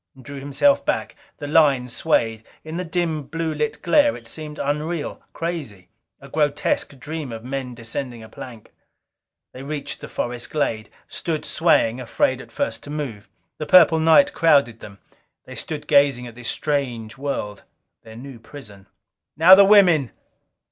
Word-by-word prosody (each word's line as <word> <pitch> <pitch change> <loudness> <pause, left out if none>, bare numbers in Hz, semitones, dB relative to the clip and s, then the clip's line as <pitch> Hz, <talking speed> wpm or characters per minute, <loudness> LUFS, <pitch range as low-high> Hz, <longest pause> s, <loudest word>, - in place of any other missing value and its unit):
Drew 140 +2 -9
himself 275 - +2
back. - - -2 0.2
The - - -7
line 145 -4 +3
swayed. 115 -4 0 0.2
In 160 +1 -6
the 180 - -2
dim, 165 -2 -2
blue 165 -1 -3
lit 150 0 -3
glare 290 +11 +4
it - - -15
seemed 155 -1 -7
unreal, 150 +2 -3
crazy. 145 - -6 0.3
A 140 - -13
grotesque 145 -1 -1
dream 150 0 -6
of 115 -1 -7
men 130 -1 -5
descending 120 +1 -6
a - - -11
plank. 115 -1 -11 0.8
They 130 - -9
reached 140 0 -6
the - - -7
forest 120 0 -4
glade. 115 -8 -2 0.2
Stood 160 -3 -4
swaying, 130 -7 +2
afraid 130 +1 0
at - - -14
first 285 - -3
to - - -10
move. 130 -9 -6 0.3
The 155 - -4
purple 170 -1 +6
night 165 - +5
crowded 140 -8 +3
them; 100 -1 -12 0.5
they 130 - -10
stood 150 +5 -6
gazing 140 -4 +3
at 120 - -10
this 120 0 -6
strange 125 -7 -2
world, 135 -7 -4 0.4
their 110 -1 -13
new 130 0 -10
prison. 105 -7 -13 0.5
"Now 170 +4 +8
the 200 +1 +9
women." 180 - +5
140 Hz, 155 wpm, -22 LUFS, 120-160 Hz, 0.8 s, the